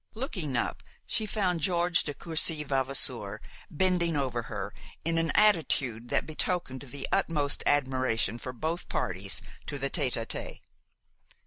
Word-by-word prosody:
Looking 185 - -2
up, 120 - -1 0.2
she 215 0 0
found 185 -5 +1
George 170 +1 +2
de 145 - -3
Courcy 160 -1 +2
Vavasour 130 -6 0 0.3
bending 170 -1 +1
over 130 -4 0
her - - -4 0.3
in 165 0 +2
an 165 0 +1
attitude 140 - +3
that - - +2
betokened 155 -4 -2
the 140 0 -5
utmost 145 -3 +2
admiration 130 -5 +2
for 130 - -4
both 160 +7 -3
parties 95 +1 -1 0.2
to 145 - -3
the 135 0 -1
tête 125 -3 +1
à 115 - -3
tête. - - -4
145 Hz, 140 wpm, -29 LUFS, 130-170 Hz, 0.3 s, attitude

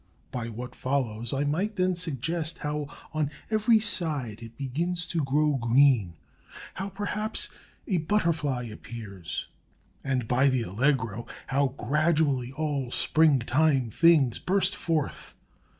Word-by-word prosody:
By 115 -2 -4
what 120 +3 -7
follows 120 -4 -2
I 140 +1 0
might 180 +9 -1
then 185 -1 +1
suggest 165 +1 -1
how 150 0 -3 0.3
on 155 -2 0 0.2
every 220 +1 +4
side 150 - -1
it 115 0 -11
begins 170 +7 -1
to 165 -4 -1
grow 150 +2 +2
green; 120 -6 +3 0.6
how, 195 +1 -4
perhaps, 205 +2 -2 0.4
a 190 - +1
butterfly 160 -7 0
appears; 105 -6 -7 0.6
and, 130 -4 -1
by 130 +4 +4
the 130 -3 +1
Allegro, 115 +1 0 0.2
how 135 -1 0
gradually 145 -1 +1
all 140 -3 -2
springtime 140 -3 +3
things 150 -5 +4
burst 195 +1 +1
forth. 160 -4 -2
140 Hz, 120 wpm, -27 LUFS, 125-165 Hz, 0.6 s, every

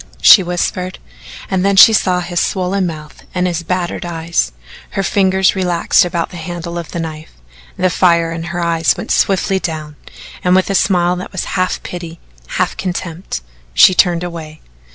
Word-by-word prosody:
she 200 - +8
whispered, 180 +1 -3 0.5
and 190 -1 -1
then 200 0 +2
she 220 +3 +9
saw 185 -3 +2
his 175 -1 -2
swollen 185 0 0
mouth 155 -2 -9
and 180 0 +1
his 175 -2 -1
battered 175 +1 -3
eye. 170 -1 -6 0.6
Her 195 - -2
fingers 190 0 +2
relaxed 180 0 +2
about 170 -2 -2
the 180 - -8
handle 170 +1 -5
of 170 - -8
the 170 - -5
knife, 160 -1 -7 0.4
the 185 0 +1
fire 170 -2 +2
in 165 0 -5
her 175 0 -4
eyes 165 -1 +1
went - - -5
swiftly 195 0 +1
down, 155 -4 -5 0.5
and 180 0 +3
with 190 +1 +2
a - - 0
smile 180 -2 +2
that 180 - -7
was 185 - -3
half 185 -1 -1
pity, 170 -2 -7 0.4
half - - 0
contempt, 175 - -5 0.3
she 185 - +7
turned 175 -2 +2
away. 160 -3 -7
175 Hz, 175 wpm, -16 LUFS, 170-185 Hz, 0.6 s, she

